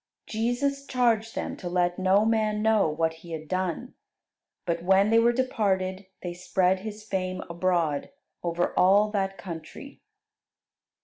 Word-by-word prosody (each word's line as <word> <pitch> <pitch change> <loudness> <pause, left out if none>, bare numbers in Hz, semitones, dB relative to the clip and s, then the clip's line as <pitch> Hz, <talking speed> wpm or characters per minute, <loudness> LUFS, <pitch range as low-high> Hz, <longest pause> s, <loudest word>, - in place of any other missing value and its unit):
Jesus 260 +5 -1
charged 230 -3 +1
them - - -3
to 180 - -5
let 175 0 0
no 190 +3 +4
man 215 -1 +1
know 220 -6 +3
what 160 +1 0
He 170 -1 -9
had 155 -1 -6
done. 185 - -2 0.7
But 170 -1 -1
when 190 +4 +4
they 225 - +6
were 235 +1 +4
departed 195 -6 -1 0.2
they 175 -1 -4
spread 185 +1 +1
His 210 +1 -7
fame 185 -3 -3
abroad 170 -4 0 0.3
over 175 0 -1
all 200 +3 +4
that 195 -2 -1
country. 170 -3 -9
190 Hz, 140 wpm, -27 LUFS, 175-220 Hz, 0.7 s, they